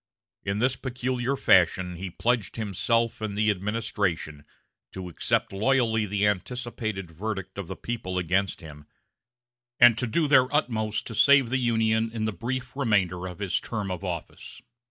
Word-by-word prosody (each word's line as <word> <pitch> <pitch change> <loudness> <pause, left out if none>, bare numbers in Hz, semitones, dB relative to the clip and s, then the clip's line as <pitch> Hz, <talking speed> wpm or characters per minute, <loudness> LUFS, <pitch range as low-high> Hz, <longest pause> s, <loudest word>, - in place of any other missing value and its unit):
In 100 +1 -1
this 125 +3 +2
peculiar 130 0 -2
fashion 90 -5 +3
he 95 +1 -5
pledged 115 +3 -1
himself 115 +2 0
and 105 -2 -3
the 105 0 +3
administration 100 -7 -2 0.5
to 95 -1 -6
accept 85 - -1
loyally 110 0 +2
the 100 +1 0
anticipated 105 -2 -3
verdict 95 +2 -5
of 95 - -5
the 95 - -5
people 110 -6 -4
against 95 +2 0
him, 75 -2 -12 0.9
and 120 -2 +7
to 125 - -1
do 155 +7 +1
their 130 -2 +5
utmost 110 -8 0
to - - -7
save 135 +1 +5
the 130 - +1
Union 115 -2 +1
in 110 -1 -2
the 110 - -1
brief 125 +5 -4
remainder 95 -9 +1
of 90 -2 -8
his 100 -2 -1
term 105 -4 -4
of 90 +1 -5
office. 85 -4 -6
110 Hz, 155 wpm, -26 LUFS, 95-120 Hz, 0.9 s, and